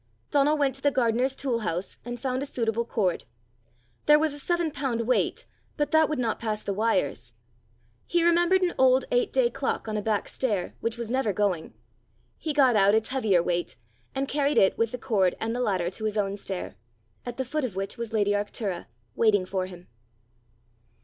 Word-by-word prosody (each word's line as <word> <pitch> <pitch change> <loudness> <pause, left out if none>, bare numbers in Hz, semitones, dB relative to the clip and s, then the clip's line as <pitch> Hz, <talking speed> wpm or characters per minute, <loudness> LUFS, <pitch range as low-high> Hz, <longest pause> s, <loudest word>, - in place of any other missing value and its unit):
Donal 290 +1 +3
went 280 -2 +2
to 270 - -11
the 285 - +4
gardener's 255 0 +1
tool 255 -5 -1
house, 180 -3 -4
and 245 0 -6
found 260 0 -2
a 285 - -3
suitable 230 -2 -1
cord. 195 -7 -1 0.8
There 300 0 +8
was 310 -1 +1
a 290 - -7
seven 345 +1 0
pound 265 -5 -1
weight, 250 +2 0 0.3
but 295 -1 0
that 315 -1 +4
would 305 - -1
not 235 -3 -1
pass 215 -2 -2
the 200 - -2
wires! 190 - 0 0.7
He 345 -1 +2
remembered 345 +2 +4
an 355 - +1
old 260 0 +5
eight - - +2
day - - +2
clock - - -2
on 215 -1 -2
a - - -1
back 210 -1 -1
stair, 210 -9 -2
which 230 0 -2
was 235 -1 -5
never 260 -4 +1
going. 190 -4 -1 0.6
He 315 - -2
got 270 -5 +4
out 200 0 +5
its 220 0 0
heavier 215 -10 +2
weight, 175 0 -2 0.4
and 270 +1 -1
carried 285 +1 0
it, 190 - +5
with 230 -1 0
the 250 - -4
cord 195 -6 +1
and 225 +1 -2
the 250 - -1
ladder, 185 -6 0
to 220 +3 -5
his 215 0 -1
own 200 -1 0
stair 190 - -6 0.5
at 245 -1 -6
the 260 - -2
foot 305 +4 -2
of 230 -7 -3
which 195 +1 -3
was 235 -2 -5
lady 205 -2 +2
Arctura 205 -2 -2 0.3
waiting 205 -4 +3
for 185 0 -2
him. 180 -1 -12
230 Hz, 200 wpm, -26 LUFS, 205-275 Hz, 0.8 s, There